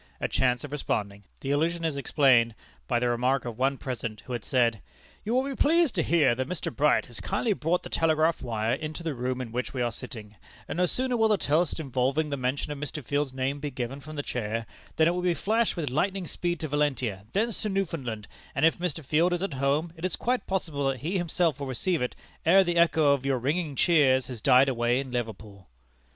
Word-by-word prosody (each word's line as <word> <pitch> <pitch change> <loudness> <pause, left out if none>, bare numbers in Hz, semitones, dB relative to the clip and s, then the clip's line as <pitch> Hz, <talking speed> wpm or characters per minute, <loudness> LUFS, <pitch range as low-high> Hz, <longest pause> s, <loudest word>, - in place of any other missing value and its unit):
a - - 0
chance 125 -1 +1
of 145 - -7
responding! 100 -8 -3 0.2
The 135 - -2
allusion 165 +3 +1
is 160 -3 0
explained 130 -4 +3 0.3
by 120 - +1
the 120 +1 +1
remark 125 +3 +1
of 120 -1 -6
one 135 +1 +2
present 115 -5 -5
who 125 - -7
had 120 -3 -3
said: 115 -2 +1 0.4
"You 225 +3 -1
will 260 - +3
be 275 0 -4
pleased 325 -1 +3
to 175 - +1
hear 155 -6 +3
that 130 +4 -3
Mr. 180 -3 -4
Bright 150 +1 +3
has 120 - -10
kindly 210 +3 0
brought 175 0 0
the - - -8
telegraph 160 0 +2
wire 115 -1 -1
into 155 +4 -4
the 160 -2 -2
room 125 0 -2
in 125 -3 -5
which 125 +3 -3
we 125 - -1
are 120 - 0
sitting, 110 -4 -9 0.3
and - - -4
no 180 0 +3
sooner 255 +3 0
will 225 -1 +4
the 210 -1 +3
toast 165 +1 +1
involving 135 +2 0
the - - 0
mention 130 +3 -2
of 145 - -5
Mr. 150 -1 -5
Field's 145 0 0
name 135 +2 -2
be 145 0 -3
given 130 +1 -4
from 155 +2 -10
the 145 - -3
chair, 115 -2 -3 0.3
than 160 - +4
it - - +4
will 180 +1 -2
be 180 -1 +1
flashed 225 +5 +1
with 150 -7 -2
lightning 185 +6 0
speed 175 0 -3
to 155 - -2
Valentia, 135 -9 -1
thence 220 +3 0
to 215 - -1
Newfoundland, 140 - -3 0.3
and - - +3
if 165 - +3
Mr. 165 -4 -3
Field 165 +6 +2
is 175 +1 -1
at 195 - -2
home, 140 +5 0
it 165 - -12
is 185 - 0
quite 245 -3 -1
possible 160 -7 -1
that 135 -2 -3
he 180 +6 -1
himself 170 -3 0
will 140 - -4
receive 155 +6 -1
it, 125 - -2 0.3
ere 190 +4 +6
the 175 -1 -1
echo 160 -3 +4
of 140 -2 -1
your 135 -1 +1
ringing 145 +4 -1
cheers 135 -6 +4
has 125 -4 -7
died 135 -1 +6
away 120 -1 +1
in 135 -2 -5
Liverpool." 110 - -5
145 Hz, 230 wpm, -27 LUFS, 125-170 Hz, 0.4 s, ere